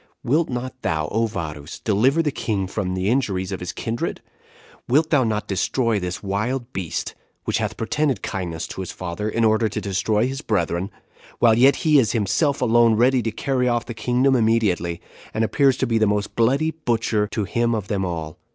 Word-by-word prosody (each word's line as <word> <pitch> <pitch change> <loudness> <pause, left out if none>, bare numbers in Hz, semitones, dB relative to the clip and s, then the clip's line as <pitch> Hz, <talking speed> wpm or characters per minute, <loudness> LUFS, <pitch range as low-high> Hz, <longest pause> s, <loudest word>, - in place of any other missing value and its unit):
Wilt 155 +7 +1
not 130 +1 -5
thou, 80 -1 -1
O 115 +1 +1
Varus! 75 -7 -6
deliver 125 +10 +2
the 150 - 0
king 105 -7 -2
from 95 -1 -3
the 95 +1 -1
injuries 100 -6 0
of 95 - -3
his 90 0 -4
kindred? 115 0 -3 0.7
Wilt 155 +5 +2
not 130 -7 +3
thou 105 -1 0
destroy 110 +3 0
this 90 0 -4
wicked - - -7
wild 120 +6 -2
beast, 90 -5 -3 0.3
which - - 0
hath - - -3
pretended 135 0 -1
kindness 85 -4 -3
to - - -5
his 95 - -5
father, 90 +4 -4
in 115 +1 +1
order 110 0 +3
to 95 - -3
destroy 105 +3 0
his 135 +2 -4
brethren; 90 - -1 0.5
while 115 -2 +5
yet 130 +4 +5
he 155 -2 +6
is 110 -6 +1
himself 130 - +1
alone 115 -1 +4
ready 125 +3 +3
to 115 - -1
carry 125 +3 0
off 120 -1 0
the 120 - -6
kingdom 125 +4 +2
immediately, 105 -8 +1 0.4
and 110 - +1
appears 135 +3 +3
to - - 0
be 115 -1 +1
the 110 - +3
most 105 0 -1
bloody 135 +7 +2
butcher 115 -8 0
to 105 0 -2
him 115 +3 0
of 105 -3 -4
them 100 -2 -1
all? 80 -4 -4
110 Hz, 195 wpm, -22 LUFS, 95-125 Hz, 0.7 s, he